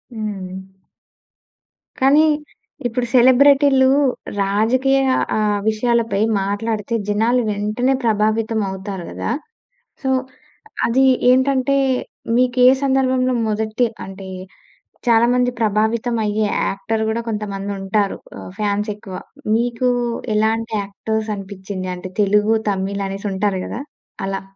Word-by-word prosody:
హ్మ్. 195 Hz, -4 st, -5 dB, 1.4 s
కానీ 290 Hz, +4 st, +5 dB, 0.6 s
ఇప్పుడు 245 Hz, +1 st, -2 dB
సెలబ్రెటీ‌లు 265 Hz, +1 st, +5 dB, 0.5 s
రాజకీయ 235 Hz, +7 st, +2 dB, 0.4 s
ఆ -, -, +1 dB, 0.3 s
విషయాలపై 230 Hz, -1 st, 0 dB, 0.2 s
మాట్లాడితే 210 Hz, +2 st, -2 dB
జనాలు 225 Hz, +4 st, +2 dB
వెంటనే 215 Hz, +6 st, 0 dB
ప్రభావితం 220 Hz, 0 st, +1 dB
అవుతారు 190 Hz, -1 st, -6 dB
గదా! 95 Hz, +2 st, -3 dB, 0.7 s
సో, 265 Hz, -, 0 dB, 0.8 s
అది 260 Hz, +3 st, +3 dB, 0.3 s
ఏంటంటే, 260 Hz, +1 st, +3 dB, 0.6 s
మీకే 250 Hz, 0 st, +4 dB, 0.2 s
సందర్భంలో 260 Hz, -2 st, +2 dB
మొదటి 220 Hz, +3 st, 0 dB, 0.2 s
అంటే, 195 Hz, 0 st, -9 dB, 0.8 s
చాలామంది 240 Hz, +2 st, +4 dB
ప్రభావితం 220 Hz, +2 st, +1 dB
అయ్యే 210 Hz, +1 st, 0 dB, 0.2 s
యాక్టర్ 220 Hz, +3 st, -2 dB
గూడా 225 Hz, +1 st, -1 dB
కొంతమంది 205 Hz, -2 st, -4 dB
ఉంటారు. 195 Hz, +1 st, 0 dB, 0.2 s
ఆహ్, -, -, -9 dB
ఫాన్స్ 210 Hz, 0 st, -1 dB
ఎక్కువ. 195 Hz, -3 st, -9 dB, 0.4 s
మీకు 240 Hz, +1 st, 0 dB, 0.5 s
ఎలాంటి 225 Hz, +1 st, 0 dB
యాక్టర్స్ 220 Hz, +2 st, -3 dB
అనిపిచింది? 190 Hz, -1 st, -6 dB
అంటే 185 Hz, +1 st, -8 dB
తెలుగు, 210 Hz, +2 st, +3 dB, 0.2 s
తమిళ్ 195 Hz, +1 st, -2 dB
అనేసి 195 Hz, +2 st, -4 dB
ఉంటారు 190 Hz, -1 st, 0 dB
గదా! 245 Hz, -, -5 dB, 0.4 s
అలా. 195 Hz, 0 st, -3 dB
220 Hz, 100 wpm, -19 LUFS, 200-245 Hz, 1.4 s, కానీ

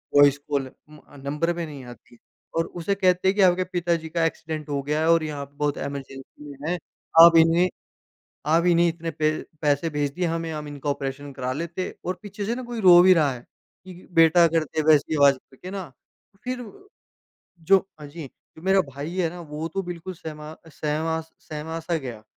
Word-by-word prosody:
Voice 145 Hz, 0 st, +6 dB
call 140 Hz, -2 st, 0 dB, 0.2 s
उम, 150 Hz, 0 st, -14 dB, 0.2 s
number 150 Hz, +5 st, -1 dB
पे 170 Hz, 0 st, -4 dB
नहीं 145 Hz, -4 st, -9 dB
आती 120 Hz, 0 st, -14 dB
है -, -, -25 dB, 0.4 s
और 165 Hz, -, +2 dB, 0.2 s
उसे 200 Hz, +4 st, 0 dB
कहते 185 Hz, -1 st, +2 dB
हैं 190 Hz, -, +3 dB
कि 205 Hz, -, +2 dB
आपके 185 Hz, -1 st, +4 dB
पिताजी 170 Hz, -3 st, -2 dB
का 165 Hz, 0 st, 0 dB
एक्सीडेंट 160 Hz, -2 st, -4 dB
हो 140 Hz, -1 st, -1 dB
गया 150 Hz, +2 st, -1 dB
है 160 Hz, -, +2 dB
और 165 Hz, -1 st, +4 dB
यहाँ 145 Hz, -2 st, -4 dB
पे 140 Hz, +1 st, -26 dB
बहुत 145 Hz, -1 st, -1 dB
इमरजेंसी 140 Hz, +1 st, -8 dB
है। 180 Hz, -, 0 dB, 0.4 s
आप 170 Hz, 0 st, +9 dB
इन्हें 165 Hz, +2 st, +5 dB, 0.8 s
आप 165 Hz, +3 st, +3 dB
इन्हें 170 Hz, -1 st, +4 dB
इतने 165 Hz, 0 st, -3 dB
पै 155 Hz, 0 st, +1 dB, 0.3 s
पैसे 145 Hz, +1 st, +1 dB
भेज 145 Hz, -2 st, -1 dB
दिए 180 Hz, +2 st, -1 dB
हमें 165 Hz, -1 st, -2 dB
हम 150 Hz, -1 st, -5 dB
इनका 145 Hz, 0 st, -5 dB
ऑपरेशन 140 Hz, 0 st, -4 dB
करा 130 Hz, -1 st, -3 dB
लेते 170 Hz, +4 st, -4 dB
और 185 Hz, 0 st, -3 dB
पीछे 205 Hz, 0 st, -6 dB
से 230 Hz, +3 st, -1 dB
ना 255 Hz, -, -5 dB
कोई 240 Hz, -1 st, -6 dB
रो 180 Hz, -3 st, +8 dB
भी 185 Hz, +1 st, +7 dB
रहा 150 Hz, -5 st, +2 dB
है, 120 Hz, -, -10 dB, 0.4 s
कि 185 Hz, -1 st, -12 dB
बेटा 165 Hz, 0 st, +6 dB
कर 165 Hz, -1 st, +1 dB
दे 155 Hz, +1 st, -2 dB
वैसी 150 Hz, +1 st, +3 dB
आवाज़ 140 Hz, -2 st, +6 dB
करके 135 Hz, +8 st, -12 dB
ना, 190 Hz, -8 st, -6 dB, 0.5 s
फिर 255 Hz, 0 st, -3 dB, 1.0 s
जो 190 Hz, +4 st, +5 dB, 0.2 s
हाँ 150 Hz, -, -9 dB
जी, 145 Hz, -1 st, -9 dB, 0.3 s
मेरा 190 Hz, +3 st, +3 dB
भाई 145 Hz, +6 st, -6 dB
है 175 Hz, -3 st, +1 dB
ना 175 Hz, +2 st, -10 dB
वो 150 Hz, 0 st, -5 dB
तो 195 Hz, -, -1 dB
बिल्कुल 175 Hz, +1 st, -6 dB
सहमा 155 Hz, -1 st, -9 dB
सहमास 160 Hz, +1 st, -3 dB
सहमा 155 Hz, +2 st, -6 dB
सा 165 Hz, +1 st, -2 dB
गया 120 Hz, -7 st, -7 dB
160 Hz, 200 wpm, -24 LUFS, 145-175 Hz, 1.0 s, आप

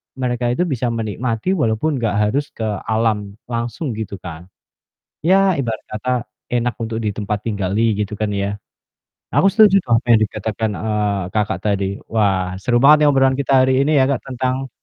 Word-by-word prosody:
mereka 125 Hz, -2 st, -1 dB
itu 180 Hz, -, +1 dB
bisa 130 Hz, -7 st, -1 dB
menikmati 115 Hz, -, -2 dB
walaupun 140 Hz, -, 0 dB
enggak 105 Hz, -3 st, -1 dB
harus 140 Hz, +5 st, -1 dB
ke 110 Hz, -, -5 dB, 0.2 s
alam 110 Hz, -2 st, 0 dB, 0.2 s
langsung 120 Hz, +5 st, -3 dB
gitu, 100 Hz, -2 st, -5 dB
kan. 85 Hz, 0 st, -8 dB, 0.8 s
Ya, 190 Hz, -1 st, +4 dB
ibarat 115 Hz, -5 st, -2 dB
kata, 110 Hz, +4 st, -4 dB, 0.4 s
enak 120 Hz, 0 st, 0 dB
untuk 110 Hz, 0 st, -3 dB
ditempat 105 Hz, -1 st, -2 dB
tinggali 100 Hz, -1 st, -1 dB, 0.2 s
gitu, 105 Hz, 0 st, -2 dB
kan, 105 Hz, -1 st, 0 dB
ya. 100 Hz, +1 st, -2 dB, 0.8 s
Aku 195 Hz, -, +5 dB
setuju 210 Hz, -3 st, +6 dB
tuh 120 Hz, -, -8 dB
apa 125 Hz, -, -4 dB
yang 110 Hz, -1 st, +5 dB
dikatakan, 110 Hz, +1 st, -3 dB
eee, 105 Hz, -2 st, -1 dB
Kakak, 105 Hz, -1 st, 0 dB
tadi. 100 Hz, -2 st, +1 dB, 0.3 s
Wah, 95 Hz, -4 st, +1 dB
seru 120 Hz, +2 st, +2 dB
banget 150 Hz, +1 st, +7 dB
nih -, -, +5 dB
obrolan 135 Hz, -1 st, +3 dB
kita 140 Hz, 0 st, 0 dB
hari 130 Hz, 0 st, +2 dB
ini 150 Hz, +3 st, +1 dB
ya, 130 Hz, -, +4 dB
Kak, 135 Hz, -, -1 dB
tentang 130 Hz, +1 st, -2 dB
115 Hz, 170 wpm, -19 LUFS, 105-130 Hz, 0.8 s, banget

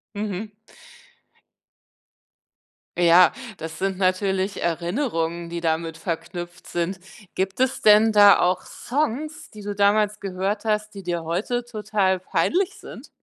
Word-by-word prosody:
Mhm. 210 Hz, 0 st, -4 dB, 2.4 s
Ja, 175 Hz, +1 st, +6 dB, 0.3 s
das 160 Hz, 0 st, -7 dB
sind 195 Hz, 0 st, -1 dB
natürlich 190 Hz, +1 st, 0 dB
Erinnerungen, 170 Hz, -, -2 dB
die 170 Hz, 0 st, -5 dB
damit 160 Hz, 0 st, -1 dB
verknüpft 175 Hz, +1 st, -6 dB
sind. 175 Hz, +2 st, -2 dB, 0.3 s
Gibt 190 Hz, +2 st, -2 dB
es 260 Hz, 0 st, +1 dB
denn 215 Hz, +1 st, +6 dB
da 205 Hz, -1 st, +7 dB
auch 180 Hz, +1 st, +2 dB
Songs, 295 Hz, +3 st, -3 dB
die 210 Hz, -1 st, -12 dB
du 205 Hz, 0 st, -3 dB
damals 205 Hz, +1 st, +2 dB
gehört 195 Hz, +2 st, -3 dB
hast, 215 Hz, -1 st, -1 dB
die 195 Hz, -, -8 dB
dir 175 Hz, -2 st, -3 dB
heute 220 Hz, +9 st, -2 dB
total 210 Hz, -4 st, 0 dB
peinlich 365 Hz, -, 0 dB
sind? -, -, -11 dB
195 Hz, 120 wpm, -23 LUFS, 175-215 Hz, 2.4 s, da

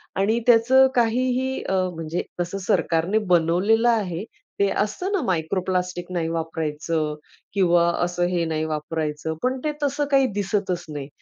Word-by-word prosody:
आणि 210 Hz, +4 st, +2 dB
त्याचं 250 Hz, +3 st, +6 dB
काहीही 255 Hz, +2 st, +1 dB
अ, 190 Hz, -, -2 dB, 0.2 s
म्हणजे 165 Hz, +1 st, -3 dB, 0.2 s
तसं 175 Hz, +3 st, -3 dB
सरकारने 170 Hz, +5 st, +1 dB, 0.2 s
बनवलेलं 185 Hz, +8 st, +3 dB
आहे. 195 Hz, -6 st, 0 dB, 0.4 s
ते 200 Hz, -, +4 dB
असतं 360 Hz, -, -1 dB
ना, 395 Hz, -3 st, +1 dB
मायक्रो 180 Hz, 0 st, 0 dB
प्लास्टिक 180 Hz, -1 st, -2 dB
नाही 170 Hz, -3 st, -1 dB
वापरायचं 160 Hz, -1 st, -2 dB, 0.4 s
किंवा 175 Hz, -3 st, +3 dB, 0.2 s
असं 175 Hz, 0 st, 0 dB
हे 175 Hz, -2 st, 0 dB
नाही 160 Hz, -1 st, -1 dB
वापरायचं, 155 Hz, 0 st, -3 dB
पण 255 Hz, +1 st, +1 dB
ते 305 Hz, -, 0 dB
तसं 285 Hz, +1 st, 0 dB
काही 270 Hz, -1 st, +5 dB
दिसतच 200 Hz, -3 st, -1 dB
नाही 145 Hz, -2 st, -5 dB
180 Hz, 145 wpm, -23 LUFS, 165-230 Hz, 0.4 s, त्याचं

